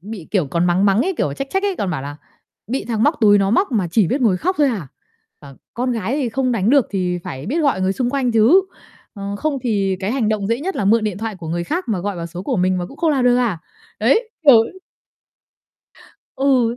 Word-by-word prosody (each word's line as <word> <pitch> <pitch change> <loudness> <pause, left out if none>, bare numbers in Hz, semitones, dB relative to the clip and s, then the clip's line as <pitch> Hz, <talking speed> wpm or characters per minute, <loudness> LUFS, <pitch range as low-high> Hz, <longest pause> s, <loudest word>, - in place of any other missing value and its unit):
bị, 200 -3 -9
kiểu, 185 -7 +1
còn 170 +5 0
mắng 180 +2 +2
mắng 200 +3 +3
ấy, 380 +1 -1
kiểu, 145 - 0
trách 275 - -5
trách 385 - 0
ấy, 400 -2 -1
còn 195 - -2
bảo 155 -6 -3
là 145 +1 -7 0.5
"Bị 255 +6 -3
thằng 225 -2 -1
móc 295 +5 +3
túi 205 -2 +6
nó 195 0 +1
móc 270 - +1
mà 205 -6 +1
chỉ 195 +2 +3
biết 270 - -1
ngồi 210 -6 +3
khóc 365 - -1
thôi 295 - +4
à? 200 - -4 0.5
À, 140 -2 -13 0.2
con 250 +1 -1
gái 230 +3 -2
thì 275 -5 -1
không 255 +2 -1
đánh 220 -1 +1
được 280 -2 +4
thì 180 -3 -1
phải 135 +2 -7
biết 305 +9 -1
gọi 275 -10 +1
người 185 +1 +1
xung 245 +4 -1
quanh 265 -3 0
chứ. 230 - +5 0.5
Ờ, 200 -1 -5
không 290 +5 -2
thì 200 -5 0
cái 200 +3 -2
hành 250 -5 0
động 215 -2 -1
dễ 230 +3 0
nhất 375 +5 -3
là - - -1
mượn 220 +3 +3
điện 205 -3 -3
thoại 220 -1 -4
của 170 -3 -8
người 170 +1 -2
khác 345 - -3
mà 215 -4 0
gọi 200 +2 -3
vào 170 -1 -5
số 175 +2 -8
của 250 +5 -2
mình 185 0 +1
mà 175 - -3
cũng 275 - -14
không 330 0 +1
làm 270 -4 +1
được 245 0 +4
à?" 235 -8 0 0.4
Đấy, 450 0 +2
kiểu 275 -5 +8 1.8
Ừ. 255 -4 +2
220 Hz, 255 wpm, -19 LUFS, 185-265 Hz, 1.8 s, kiểu